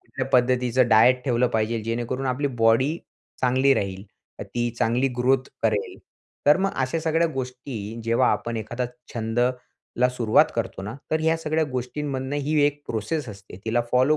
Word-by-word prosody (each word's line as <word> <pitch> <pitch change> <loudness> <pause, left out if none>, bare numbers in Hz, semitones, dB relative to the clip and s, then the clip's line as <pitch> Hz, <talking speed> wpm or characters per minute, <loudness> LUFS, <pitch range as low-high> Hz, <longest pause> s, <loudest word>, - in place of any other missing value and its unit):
कुठल्या 135 -1 -5
पद्धतीचं 125 -1 +3
डायट 125 +3 +5
ठेवलं 125 -1 +2
पाहिजे. 110 0 0
जेणेकरून 120 +4 -2
आपली 130 +3 0 0.2
बॉडी 130 +8 +4 0.4
चांगली 130 +2 +3
राहील, 95 -1 -3 0.4
तर - - -5
ती 120 0 -2
चांगली 125 +4 +2
ग्रोथ 130 +1 +2
करेल. 105 -3 0 0.5
तर 145 - +7
मग 195 +1 0
अशा 130 +5 0
सगळ्या 160 +1 +2
गोष्टी, 125 -4 -5
जेव्हा 115 +2 +3
आपण 120 -1 -3
एखादा 120 +3 -3 0.3
छंदला 120 +2 -1
सुरुवात 115 -3 +3
करतो - - -3
ना, 105 +3 -5 0.2
तर 155 0 +1
ह्या 160 +1 +2
सगळ्या 160 0 0
गोष्टींमधनं 130 +2 -3
ही 150 +1 +1
एक 145 0 -3
प्रोसेस 115 +5 -3
असते. 100 -3 -11
तिला 115 +2 +1
फॉलो 130 +5 +4
125 Hz, 155 wpm, -24 LUFS, 115-135 Hz, 0.5 s, तर